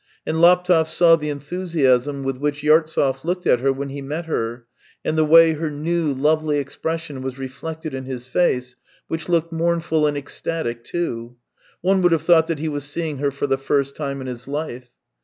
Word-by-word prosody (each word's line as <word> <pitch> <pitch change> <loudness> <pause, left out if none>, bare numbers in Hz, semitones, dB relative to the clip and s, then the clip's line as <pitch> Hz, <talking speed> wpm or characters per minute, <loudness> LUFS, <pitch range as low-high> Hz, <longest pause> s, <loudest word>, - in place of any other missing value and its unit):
And 160 +1 -1
Laptev 180 -2 +5
saw 165 +1 +5
the 150 -2 -4
enthusiasm 145 -3 0
with 135 -1 -2
which 145 +1 -2
Yartsev 150 -3 +2
looked 180 +2 -2
at 125 - +4
her 135 +2 +2
when 140 +1 -4
he 140 +1 -6
met 150 +5 -4
her, 120 -6 -3 0.4
and 155 - 0
the 155 - +3
way 165 +1 +7
her 155 +1 -3
new, 155 +1 -1
lovely 150 +2 +1
expression 145 +1 -4
was 130 0 -5
reflected 155 +4 -6
in 130 0 -5
his 125 -2 -6
face, 125 -3 0 0.3
which 165 +2 -5
looked 170 -1 +1
mournful 165 -2 +1
and 145 -1 -1
ecstatic 140 -4 -4
too. 120 -9 -4 0.5
One 190 +1 +2
would 175 -1 +4
have 165 - +1
thought 165 -2 +5
that 165 - -1
he 160 +2 -3
was 145 -2 -3
seeing 150 -1 -4
her 140 0 +1
for 140 +1 -3
the 135 -1 0
first 140 0 0
time 140 -2 -4
in - - -6
his 125 -1 -7
life. 140 -4 -5
150 Hz, 195 wpm, -21 LUFS, 135-165 Hz, 0.5 s, way